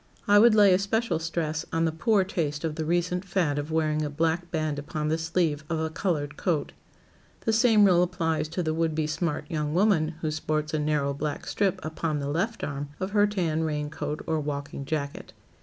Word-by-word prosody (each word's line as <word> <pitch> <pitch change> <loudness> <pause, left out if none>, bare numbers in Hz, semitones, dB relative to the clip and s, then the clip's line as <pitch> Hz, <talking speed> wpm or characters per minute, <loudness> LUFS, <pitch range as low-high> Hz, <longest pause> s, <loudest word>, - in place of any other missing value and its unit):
I 205 0 +7
would 230 0 +6
lay 205 -3 +7
especial 200 -1 +1
stress 160 -1 -2
on 165 0 +1
the 160 - +1
poor 200 +5 +2
taste 155 -6 -2
of 160 -2 -1
the 160 0 -3
recent 175 +2 0
fad 175 -7 0
of 145 +2 -5
wearing 155 -1 +1
a 150 - -2
black 165 +3 -1
band 155 -3 -1
upon 150 +1 -3
the 160 - +1
sleeve 160 -2 0
of 165 -1 -1
a 160 0 -2
colored 150 -5 -2
coat. 165 -6 -1 0.7
The 225 - 0
same 220 -2 +5
rule 180 -3 +5
applies 170 -3 0
to 170 +3 -3
the 155 -1 0
would 160 -1 0
be 155 -1 0
smart 155 +1 -2
young 150 -2 -2
woman 175 -5 +2
who 155 - -1
sports 155 0 -2
a 155 - +1
narrow 150 -2 0
black 145 +1 -4
strip 195 -2 0
upon 155 -1 -2
the 140 -1 -3
left 195 +10 -1
arm 145 0 -4
of 190 +1 -3
her 205 0 +4
tan 170 -6 -1
rain 150 -1 -2
coat 150 0 -4
or 160 -1 0
walking 140 -1 -4
jacket. 140 -1 -4
160 Hz, 205 wpm, -27 LUFS, 150-180 Hz, 0.7 s, I